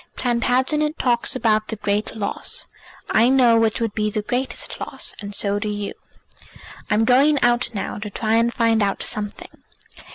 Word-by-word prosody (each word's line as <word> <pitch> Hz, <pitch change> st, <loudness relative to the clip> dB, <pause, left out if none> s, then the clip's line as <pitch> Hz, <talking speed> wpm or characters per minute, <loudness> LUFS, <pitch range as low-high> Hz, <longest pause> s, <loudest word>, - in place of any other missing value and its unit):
Plantagenet 260 Hz, +5 st, +1 dB
talks 240 Hz, -2 st, +1 dB
about 215 Hz, -2 st, +1 dB
the 220 Hz, -, -4 dB
great 210 Hz, +1 st, -2 dB
loss; 205 Hz, -2 st, -3 dB, 0.5 s
I 230 Hz, +3 st, +5 dB
know 245 Hz, -4 st, +5 dB
which 225 Hz, +2 st, +1 dB
would 225 Hz, -3 st, -1 dB
be 215 Hz, -1 st, 0 dB
the 210 Hz, 0 st, -3 dB
greatest 250 Hz, +4 st, -3 dB
loss, -, -, -4 dB
and 200 Hz, -1 st, -7 dB
so 200 Hz, 0 st, 0 dB
do 210 Hz, 0 st, -3 dB
you. 205 Hz, -1 st, -4 dB, 1.0 s
I'm 215 Hz, +2 st, +3 dB
going 275 Hz, +5 st, +4 dB
out 240 Hz, 0 st, +2 dB
now 200 Hz, -, -4 dB
to 210 Hz, 0 st, -5 dB
try 220 Hz, +2 st, -1 dB
and 230 Hz, +1 st, +2 dB
find 230 Hz, -2 st, +2 dB
out 200 Hz, -1 st, 0 dB
something. 210 Hz, -1 st, -7 dB
225 Hz, 165 wpm, -22 LUFS, 210-245 Hz, 1.0 s, I